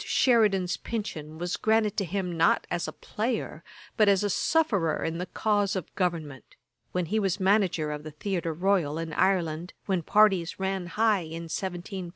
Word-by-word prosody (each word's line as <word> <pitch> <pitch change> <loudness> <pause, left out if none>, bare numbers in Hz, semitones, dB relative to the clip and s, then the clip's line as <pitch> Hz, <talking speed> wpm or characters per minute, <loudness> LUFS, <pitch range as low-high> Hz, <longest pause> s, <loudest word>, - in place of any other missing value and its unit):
Sheridan's 205 -8 +3
pension 160 -9 -5
was 175 +1 -2
granted 220 -1 +2
to 200 - +1
him 180 0 -3
not 165 0 +3
as 175 -1 -1
a - - -4
player, 230 +4 -3 0.3
but 215 -2 +5
as 195 0 +3
a 205 - 0
sufferer 200 - +1
in 165 +1 -2
the 180 - -3
cause 205 -2 0
of 185 -5 -5
government, 165 -7 -3 0.4
when 180 -1 -1
he 215 +6 0
was 195 -2 0
manager 190 -6 +2
of 150 0 -4
the 155 - -8
Theatre 170 +2 -3
Royal 175 -3 +1
in 165 -1 -4
Ireland, 175 -2 0
when 190 -3 0
parties 195 -1 +3
ran 190 -1 -2
high 210 +2 +2
in 165 +1 -6
1753. 180 +2 -5
185 Hz, 175 wpm, -27 LUFS, 165-205 Hz, 0.4 s, but